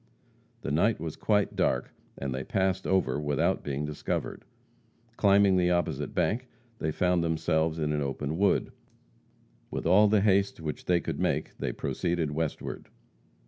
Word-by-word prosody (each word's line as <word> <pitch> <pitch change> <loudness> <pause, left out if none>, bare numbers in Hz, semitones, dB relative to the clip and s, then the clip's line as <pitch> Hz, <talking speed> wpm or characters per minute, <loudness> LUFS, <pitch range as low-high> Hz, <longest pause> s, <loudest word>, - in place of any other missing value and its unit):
The - - -2
night 100 +10 +2
was 80 -1 -5
quite 105 -2 +1
dark, - - 0 0.2
and 70 -2 -3
they 65 +1 -3
passed 95 +3 0
over 95 -5 +1
without 75 -2 0
being 70 +1 -2
discovered. 75 -1 -4 0.7
Climbing 100 -2 +4
the 90 -1 +3
opposite 85 0 -1
bank, 125 +3 0 0.3
they 80 - -1
found 90 +1 +1
themselves 80 0 0
in 75 -1 -1
an 75 - 0
open 70 +2 -3
wood. 100 0 +2 1.0
With - - -4
all 100 +5 +6
the 105 -1 +3
haste 100 -2 +2
which 80 -2 -5
they 90 -1 +2
could - - -4
make, - - -1
they - - -1
proceeded 85 -3 -2
westward. 80 0 -4
85 Hz, 150 wpm, -28 LUFS, 75-95 Hz, 1.0 s, all